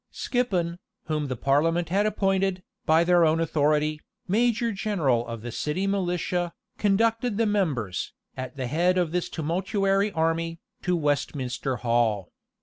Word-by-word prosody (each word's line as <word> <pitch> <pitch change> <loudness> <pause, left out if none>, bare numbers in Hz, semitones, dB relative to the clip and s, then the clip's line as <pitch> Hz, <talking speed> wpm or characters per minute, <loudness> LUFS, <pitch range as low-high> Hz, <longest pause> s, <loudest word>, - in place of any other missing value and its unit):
Skippon, 180 -9 -1 0.2
whom 155 -2 -2
the 130 - -2
parliament 165 +7 +1
had 200 +4 +2
appointed, 195 -2 0 0.2
by 160 +2 +5
their 175 0 +4
own 160 0 +3
authority, 150 -1 +1 0.3
major 230 +3 +2
general 160 - 0
of 115 -2 -6
the 120 - -5
city 150 - -2
militia,[*] 180 -3 -1 0.3
conducted 225 +2 +2
the 230 - +3
members, 150 - -1 0.2
at 130 -1 -6
the 130 - -2
head 175 +8 +2
of 175 -3 +1
this 180 0 -1
tumultuary 195 +5 0
army, 165 0 0 0.2
to 180 -1 +1
Westminster 135 -4 -1
Hall. 115 -6 0
170 Hz, 140 wpm, -26 LUFS, 145-195 Hz, 0.3 s, by